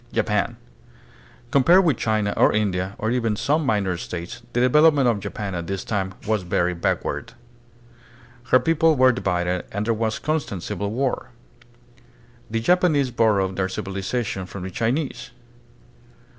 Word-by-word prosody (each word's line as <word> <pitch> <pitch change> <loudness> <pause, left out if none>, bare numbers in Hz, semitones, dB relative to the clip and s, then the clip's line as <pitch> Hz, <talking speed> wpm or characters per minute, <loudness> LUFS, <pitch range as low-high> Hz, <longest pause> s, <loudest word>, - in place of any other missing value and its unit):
Japan. - - 0 0.9
Compared 175 +8 +5
with 155 -6 +3
China 110 -3 0
or - - +4
India, 95 -2 -1
or 110 - -1
even 115 -3 0
some 150 +8 +1
minor 100 -9 0
states, 85 +5 -6
the 120 - +1
development 145 +2 +5
of 115 -4 +2
Japan 100 0 -5
at 85 -1 -4
this 95 -1 -3
time 95 -3 -2
was 110 -1 0
very 90 0 0
backward. 85 - -2 1.1
Her 130 - +5
people 165 0 +3
were 130 -1 +5
divided 90 -6 -1
and 105 +2 -2
there 115 - +2
was 110 0 -1
constant 130 - -2
civil 100 0 -3
war. 125 +2 -2 1.2
The 115 +1 -1
Japanese 155 -3 +2
borrowed 100 -5 +1
their 95 -1 +1
civiliza 95 +5 -3
tion 95 -2 -4
from 95 0 -8
the 95 - -5
Chinese. 120 - -2
110 Hz, 145 wpm, -23 LUFS, 95-130 Hz, 1.2 s, Compared